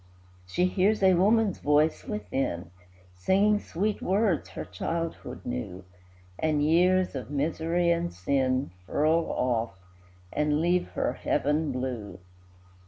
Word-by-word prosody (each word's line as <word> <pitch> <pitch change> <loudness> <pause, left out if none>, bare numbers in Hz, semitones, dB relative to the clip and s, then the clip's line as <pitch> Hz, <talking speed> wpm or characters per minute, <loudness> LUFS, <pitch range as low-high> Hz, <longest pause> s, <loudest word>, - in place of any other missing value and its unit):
She 175 - +1
hears 195 +3 +1
a 190 -1 +6
woman's 205 +3 +3
voice 150 +2 +2
within, 135 - -3 0.4
Singing 200 - +2
sweet 205 +2 -2
words 195 -3 +1
her - - -6
childhood 165 - -4
knew, 90 +10 -5 0.6
And 155 -2 +1
years 180 +4 +3
of 130 -4 -6
misery 165 +4 0
and 170 - 0
sin 130 +6 0 0.2
Furl 160 +3 +2
off, 115 -5 -1 0.6
and 150 0 +1
leave 175 +2 +1
her - - 0
heaven 150 +1 0
blue. 125 -5 -4
155 Hz, 115 wpm, -27 LUFS, 130-180 Hz, 0.6 s, a